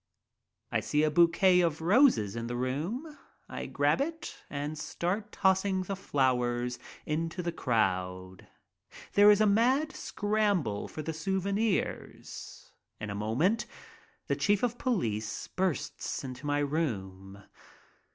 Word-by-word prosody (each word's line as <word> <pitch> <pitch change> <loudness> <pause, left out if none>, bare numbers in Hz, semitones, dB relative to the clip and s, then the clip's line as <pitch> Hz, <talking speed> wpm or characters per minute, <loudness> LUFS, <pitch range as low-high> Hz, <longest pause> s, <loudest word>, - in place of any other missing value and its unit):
I - - +2
see 150 +1 +1
a 155 - +2
bouquet 175 +3 +5
of 165 -3 0
roses 175 - +4
in 115 0 -4
the 120 - -3
room. 170 - -3 0.3
I - - -6
grab - - +1
it 325 +3 -4
and 145 +2 -4
start 185 +7 -3
tossing 190 0 +2
the 195 +2 -4
flowers 125 -7 0 0.3
into 165 +3 -2
the 170 - -1
crowd. 95 - -1 0.7
There 205 +1 +7
is 210 0 +6
a - - +5
mad 250 +9 +3
scramble 205 - -1
for 155 - -7
the 160 - -3
souvenirs. 195 +5 -3 0.3
In 105 -1 -5
a - - -3
moment 125 - 0 0.6
the - - 0
chief 205 +1 +1
of 245 0 0
police 115 - -1
bursts 185 -6 -2
into 130 +2 -7
my 145 0 +1
room. 100 - -3
165 Hz, 130 wpm, -30 LUFS, 120-200 Hz, 0.7 s, There